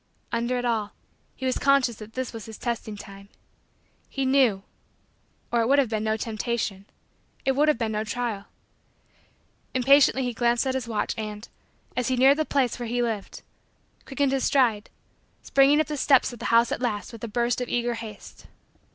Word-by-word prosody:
Under 235 +2 0
it 245 - -2
all, 220 -3 -1 0.4
he 260 - -6
was 255 - 0
conscious 275 -5 +3
that 215 0 -11
this 260 -1 -4
was 225 0 -8
his 220 - -9
testing 230 -3 -4
time. 200 0 -12 0.8
He 270 -1 -2
knew 260 -7 +3 0.9
or 235 - +2
it 225 - +1
would 280 +2 +4
have 270 -5 +3
been 215 -1 -2
no 220 0 0
Temptation 215 -3 -3 0.6
it 270 - +3
would 290 +3 +2
have 305 - +3
been 225 -2 -1
no 215 0 -1
trial. 220 -3 -3 1.3
Impatiently 270 +1 +5
he 245 -1 -2
glanced 240 +2 +1
at 260 - 0
his 260 -2 -3
watch 215 -3 -1
and, 210 0 -6 0.5
as 250 -1 0
he 260 - +1
neared 270 +3 +6
the 310 - +1
place 260 -5 0
where 240 - -4
he 245 +1 0
lived, 220 -4 -4 0.6
quickened 275 0 0
his 270 -1 0
stride, 230 -7 +2 0.5
springing 275 +2 +4
up 310 - +3
the 300 +1 -4
steps 270 -2 +3
of 240 - -10
the 240 - -6
house 230 0 +4
at - - -2
last 215 -5 -2
with 230 -2 -11
a - - -2
burst 240 +2 0
of 250 - -3
eager 240 0 0
haste. 225 -3 -10
240 Hz, 190 wpm, -25 LUFS, 220-260 Hz, 1.3 s, neared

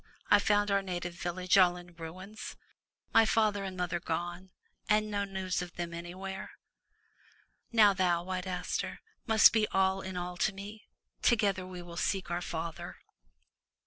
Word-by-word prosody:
I 205 - +8
found 205 0 +2
our 200 0 +3
native 175 -2 -4
village 180 +2 +1
all 180 -1 +5
in 175 0 -12
ruins, 185 +6 -8 0.6
my 225 - +7
father 215 -2 +2
and 190 -1 -5
mother 180 -1 -1
gone, 175 +3 -4 0.4
and 215 0 +3
no 200 -1 0
news 190 -2 -2
of 175 -1 -7
them 170 -1 -4
anywhere. 185 +3 -6 1.2
Now 215 -4 +6
thou. 180 -3 +1
White 185 0 -4
Aster, 180 -1 -3 0.3
must 220 -1 +7
be 220 -2 +3
all 190 0 +2
in 190 -1 -6
all 180 0 -4
to 205 - +1
me. 205 +3 -9 0.3
Together 200 -5 +2
we 180 -1 -8
will 170 -1 -10
seek 190 -2 -1
our 175 +1 -1
father." 165 -1 -5
185 Hz, 155 wpm, -31 LUFS, 175-200 Hz, 1.2 s, I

